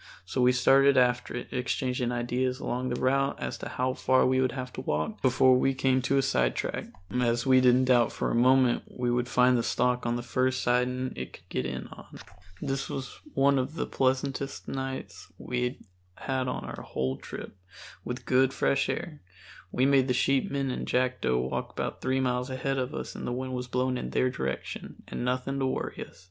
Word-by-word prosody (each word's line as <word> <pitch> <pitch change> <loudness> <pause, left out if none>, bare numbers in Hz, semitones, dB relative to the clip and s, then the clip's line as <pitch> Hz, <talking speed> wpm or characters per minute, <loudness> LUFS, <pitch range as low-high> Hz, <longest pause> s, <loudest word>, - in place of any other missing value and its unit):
So 125 +7 -1
we 125 0 +6
started 135 +2 +5
after 125 -1 +2
it, 125 - -5
exchanging 125 -1 -1
ideas 125 +2 -1
along 125 0 -2
the 120 - -2
route 135 +2 +1
as - - -4
to - - -6
how 130 0 -1
far 130 0 +3
we 130 0 +3
would 130 -2 +1
have 130 -1 -5
to - - -5
walk 75 -10 -2
before 130 0 +5
we 135 +1 +2
came 130 0 +2
to 135 +2 +1
a 135 - +3
sidetrack, 65 - 0 0.3
as 120 -1 +1
we 130 -1 +6
didn't 125 0 +5
doubt 125 -2 +4
for - - -2
a - - -1
moment 125 +1 +4
we 125 -1 -2
would 120 0 0
find 125 0 +4
the 120 - +2
stock 125 +1 0
on 120 - +1
the 120 - -3
first 130 +1 0
siding 125 +1 +1
it 65 0 -6
could - - -15
get 65 - -2
in 65 0 -5
on. - - -12 0.5
This 135 0 -2
was 135 -1 -6 0.2
one 140 0 +4
of 130 +5 -3
the - - -1
pleasantest 135 +1 -1
nights 130 -11 -5
we 125 0 -2 0.4
had 130 -1 -2
on 125 - -3
our - - -7
whole 65 0 -2
trip, - - -8 0.5
with 125 +1 -5
good 130 +1 +3
fresh 140 - +1
air 155 -4 -4 0.5
(we 130 - +2
made 135 -1 +4
the 125 - +1
sheepmen 135 +1 +1
and - - -4
Jackdo 125 - +1
walk - - -3
about - - -4
three 130 +1 +1
miles 125 -1 0
ahead 135 +1 -1
of 130 0 -3
us - - -5
and - - -6
the - - -1
wind 130 +1 -3
was 125 0 -3
blowing 125 +1 0
in - - -4
their 130 - +1
direction) 65 - -5
and - - -4
nothing 130 +2 -1
to 135 - +1
worry - - -3
us. - - -21
130 Hz, 205 wpm, -28 LUFS, 125-130 Hz, 0.5 s, we